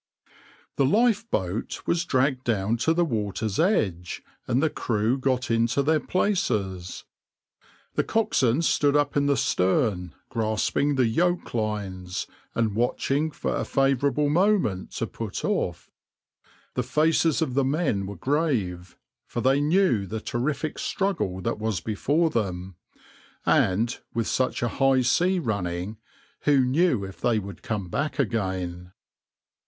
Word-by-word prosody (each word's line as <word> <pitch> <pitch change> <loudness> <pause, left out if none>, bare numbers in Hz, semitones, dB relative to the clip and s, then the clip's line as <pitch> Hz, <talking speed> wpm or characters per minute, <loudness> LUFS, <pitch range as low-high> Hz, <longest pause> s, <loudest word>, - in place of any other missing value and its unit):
\par - - -30 0.4
The 140 - +4
lifeboat 205 - 0
was 170 0 +1
dragged 130 -2 +1
down 110 -2 +1
to 140 +8 +1
the 175 0 +3
water's 105 - -2
edge, 100 - 0 0.2
and 125 - +2
the 160 - +3
crew 110 +1 0
got 130 -2 0
into 115 +4 +2
their 155 +2 +3
places. 110 - -1 0.9
The - - +1
coxswain 160 - +1
stood 145 -2 +2
up 145 -1 +2
in 145 0 +2
the 140 -1 +2
stern, 95 - +1
grasping 115 +5 0
the 130 -2 +3
yoke 175 +10 0
lines, 100 -5 -3 0.3
and 115 -3 +1
watching 135 +6 0
for 150 - -3
a - - -1
favourable 135 +1 +2
moment 170 - +2
to - - -2
put - - -5
off. - - -2 0.8
The 125 - 0
faces 155 +5 +2
of 130 - -3
the 140 +1 +2
men 135 - 0
were 100 - -6
grave, 105 - -1 0.3
for 120 - -3
they 135 +3 +3
knew 150 - +2
the 110 +4 -4
terrific 140 +7 -2
struggle 190 - -1
that 115 +2 -2
was 110 -4 -1
before 145 - 0
them, 95 -4 -2 0.7
and, 110 +6 +2 0.2
with 115 -1 0
such 130 +1 0
a - - +2
high 135 -1 +4
sea 175 +10 +2
running, 100 - -2 0.5
who 145 -2 +5
knew 130 - +2
if 95 -3 -11
they 120 -2 +2
would 100 -1 -6
come 105 -4 -3
back 140 - -2
again? 95 -8 -2
125 Hz, 140 wpm, -25 LUFS, 100-145 Hz, 0.9 s, who